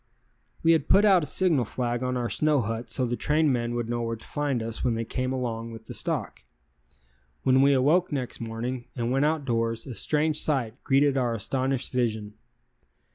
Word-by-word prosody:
We 165 - +5
had 165 - +2
put 200 +3 +6
out 190 -4 +6
a 150 - -3
signal 170 -9 +2
flag 120 +1 -2
on 125 0 -1
our 120 -1 -1
snow 150 +2 +2
hut 115 +2 -4
so 130 - 0
the 120 0 -1
trainmen 130 -6 +1
would 120 -1 -2
know 120 0 -2
where 115 0 -2
to 110 - -14
find 140 -5 -2
us 115 0 -4
when 120 -3 +1
they 115 0 -2
came 130 +3 -2
along 115 -3 -3
with 115 -1 -10
the - - -8
stock. - - -3 1.0
When 130 0 +4
we 140 +1 +5
awoke 155 +8 +3
next 130 -5 -3
morning 120 +2 -4
and 120 -1 -2
went 135 +2 +2
outdoors 120 -7 -1
a 130 - -6
strange 150 +7 +1
sight 130 -5 -1
greeted 140 0 +3
our 120 -2 0
astonished 130 +4 -1
vision. 110 -4 -1
125 Hz, 190 wpm, -26 LUFS, 115-145 Hz, 1.0 s, put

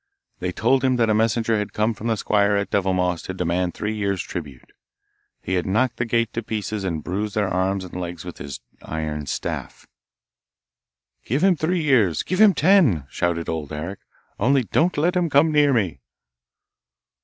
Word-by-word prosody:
They 90 - -2
told 125 +8 +2
him 130 -1 +3
that 115 -3 +2
a - - +4
messenger 110 0 +1
had 105 - -4
come 110 +2 +1
from 110 +2 -6
the 115 -1 +1
squire 100 0 +2
at 100 0 -1
Devilmoss 90 -3 +1
to 95 - -5
demand 90 0 -1
three 105 +1 -2
years' 100 -3 -1
tribute. 70 -7 -8 0.7
He 95 - -3
had 90 0 0
knocked 115 +5 +1
the 120 - -1
gate 115 -1 0
to 115 - -2
pieces 110 -2 -4
and 85 -5 -3
bruised 105 +4 -3
their 105 -2 +1
arms 95 +1 0
and 90 - -10
legs 85 -3 -6
with - - -8
his 70 -3 -7 0.2
iron 75 -2 -4
staff. - - -5 1.4
'Give 135 - -1
him 190 -2 +5
three 165 +2 0
years'! 115 - +3
give 185 +3 0
him 210 -3 +7
ten!' 150 - +4
shouted 85 -1 -1
Old 80 -3 -4
Eric, 85 +6 -5 0.4
'only 135 +4 +3
don't 165 +10 +1
let 175 +5 +2
him 175 -2 +1
come 150 +3 +4
near 145 -1 +4
me. 95 - 0
105 Hz, 180 wpm, -23 LUFS, 90-125 Hz, 1.4 s, him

